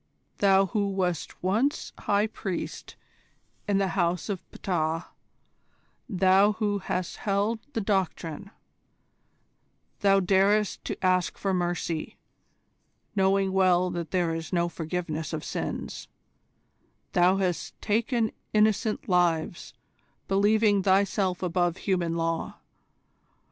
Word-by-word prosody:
"Thou 195 -1 +5
who 200 +1 -1
wast 180 -5 -2
once 220 +10 0
High 205 +1 +2
Priest 195 -4 -5 0.7
in 200 -1 +2
the 195 -1 +1
House 170 +2 0
of 190 -3 -3
Ptah: 165 -2 -2 1.0
thou 195 +1 +4
who 205 -1 -1
hast 180 -1 -3
held 205 +3 0
the 225 - -1
Doctrine: 190 -3 -2 1.5
thou 195 -1 +4
darest 195 +2 +2
to - - -4
ask 185 -1 +2
for 195 -1 -1
mercy, 175 -2 -2 1.0
knowing 195 0 +2
well 185 -1 +3
that 170 -2 -4
there 175 -2 0
is 165 0 -5
no 170 -2 +1
forgiveness 165 -1 -4
of 155 - -3
sins: - - -4 1.0
thou 180 +2 +4
hast 185 -3 -2
taken 225 +1 0 0.2
innocent 215 0 +2
lives, 175 -3 0 0.5
believing 205 +1 +3
thyself 190 -1 +1
above 175 -1 0
human 175 -4 -1
law. 165 0 -2
190 Hz, 105 wpm, -27 LUFS, 175-200 Hz, 1.5 s, Thou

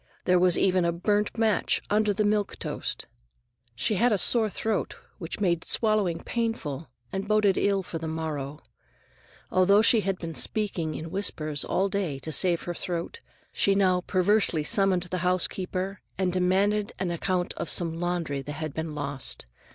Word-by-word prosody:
There 180 0 +4
was 180 -1 +4
even 185 -2 +3
a 170 - +2
burnt 205 +6 0
match 220 -2 +2
under 210 0 +3
the 210 +2 0
milk 205 -1 0
toast. - - -4 0.7
She 185 - 0
had 240 +5 +3
a 210 - +3
sore 220 +3 +4
throat, 220 +2 -2 0.2
which 170 +1 -6
made 175 -4 +1
swallowing 210 -7 +1
painful 170 - -3 0.2
and 195 +1 -3
boded 210 -2 +3
ill 200 -1 +1
for 165 -2 -6
the 160 - -5
morrow. 150 -3 -4 0.9
Although 200 +3 +5
she 225 -1 +5
had 195 -1 -1
been 165 -2 -6
speaking 170 - -1
in 160 +1 -6
whispers 155 -7 -1
all 195 - +1
day 190 -8 -2
to 155 +4 -6
save 175 +1 +2
her 175 - -3
throat, 175 - -4 0.3
she 195 - +3
now 185 -2 +3
perversely 185 -3 +2
summoned 190 +2 +2
the 180 +1 -4
housekeeper 185 +2 -1 0.2
and 185 -2 0
demanded 195 +3 +1
an 185 -2 -2
account 180 +1 -1
of - - -4
some 165 -2 +1
laundry 170 -5 -2
that 145 +2 -6
had 155 -1 -5
been 160 -1 -4
lost. 140 -2 -4
185 Hz, 165 wpm, -27 LUFS, 165-200 Hz, 0.9 s, Although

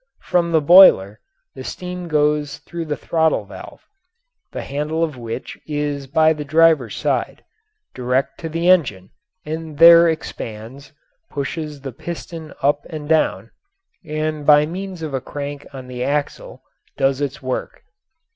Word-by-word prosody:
From 170 -1 +1
the 160 -1 +3
boiler 145 - +7 0.3
the - - -9
steam 180 -1 -6
goes 150 -2 0
through 170 -1 -7
the 150 -2 -3
throttle 160 -1 0
valve - - -12 0.7
the - - -5
handle 150 +4 -2
of 155 -4 -2
which 115 0 -7
is 145 -2 -3
by 160 +2 +3
the 150 -1 -6
driver's 155 -4 +3
side - - -2 0.5
direct 125 +2 -1
to 165 - -5
the 165 +2 -2
engine, 120 - +2 0.3
and 155 -1 -6
there 170 +1 +8
expands, 125 -4 -6 0.4
pushes 150 0 -5
the 135 -1 -6
piston 165 +2 -8
up 145 +1 +2
and 150 -2 -7
down, 160 0 +1 0.5
and 155 -1 -3
by 150 0 +6
means 185 +1 -6
of 155 -3 -5
a 135 - -2
crank 145 +1 -7
on 130 -2 -9
the 125 -1 -5
axle 145 +2 -3 0.3
does 135 0 +1
its 140 -1 -4
work. 130 0 -4
150 Hz, 145 wpm, -20 LUFS, 140-160 Hz, 0.7 s, there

